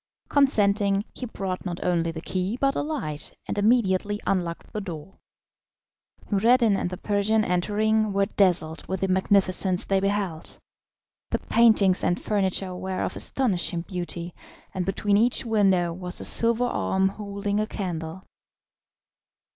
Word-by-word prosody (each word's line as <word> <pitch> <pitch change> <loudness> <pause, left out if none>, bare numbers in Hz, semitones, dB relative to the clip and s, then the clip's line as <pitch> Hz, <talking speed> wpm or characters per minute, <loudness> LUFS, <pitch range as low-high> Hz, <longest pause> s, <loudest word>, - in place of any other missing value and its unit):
Consenting, 205 -7 +2
he 250 - -6
brought 190 -4 -4
not 175 -2 -4
only 170 -2 +1
the 160 -1 -6
key, 185 +6 -2
but 275 0 +2
a - - -1
light, 275 - -5
and - - -3
immediately 205 -2 +2
unlocked 175 -3 -2
the 215 - -3
door. 175 -1 -9 1.1
Noureddin 225 +1 +4
and 180 - -2
the 180 - -6
Persian 210 +2 +1
entering, 215 +4 +1
were 200 0 +2
dazzled 175 -6 +1
with 190 -1 -3
the 195 - +1
magnificence 190 -1 +2
they 195 -1 +1
beheld. 195 -4 -3 0.7
The - - 0
paintings 215 -5 +3
and 175 - +1
furniture 190 -2 -1
were 185 +1 -3
of - - -3
astonishing 185 -9 0
beauty, 175 -1 -5 0.4
and 185 -1 -3
between 200 +1 +1
each 235 +3 +1
window 190 -6 +2
was 180 +1 -4
a - - -5
silver 235 +1 +4
arm 190 -5 0
holding 200 0 -3
a 215 - -1
candle. 175 -3 -5
195 Hz, 140 wpm, -25 LUFS, 180-210 Hz, 1.1 s, Noureddin